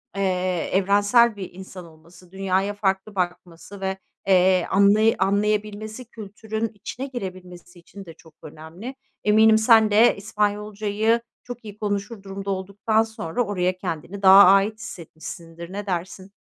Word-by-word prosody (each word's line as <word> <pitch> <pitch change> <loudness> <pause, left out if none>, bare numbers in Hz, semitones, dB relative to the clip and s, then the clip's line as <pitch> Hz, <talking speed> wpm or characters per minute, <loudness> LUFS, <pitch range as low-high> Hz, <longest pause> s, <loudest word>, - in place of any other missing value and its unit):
eee, 185 -3 -1
evrensel 205 +4 +3
bir 190 -3 -8
insan 185 -1 -10
olması, 170 +2 -18
dünyaya 195 +1 -1
farklı 200 0 -2
bakması 180 +1 -5
ve, 190 0 -2 0.3
eee, 185 -1 +4
anlay 205 +3 +4
anlayabilmesi, 210 +3 -1
kültürün 220 +1 -5
içine 230 +5 -7
girebilmesi 180 -7 -9
için 195 +3 -13
de 165 - -11
çok 160 0 -20
önemli. 165 - -10 0.3
Eminim 220 +1 +5
sen 220 -1 +5
de 220 +3 +5
İspanyolcayı 210 +2 -1 0.2
çok 245 -1 -9
iyi 205 -1 -10
konuşur 205 0 -4
durumda 195 0 -7
olduktan 200 +3 0
sonra 220 -1 -3
oraya 185 -3 -1
kendini 185 +2 -6
daha 195 +1 +9
ait 195 +3 +5
hissetmişsindir, 170 -2 -9
ne 205 +1 -5
dersin? 185 +1 -5
200 Hz, 130 wpm, -23 LUFS, 185-215 Hz, 0.3 s, daha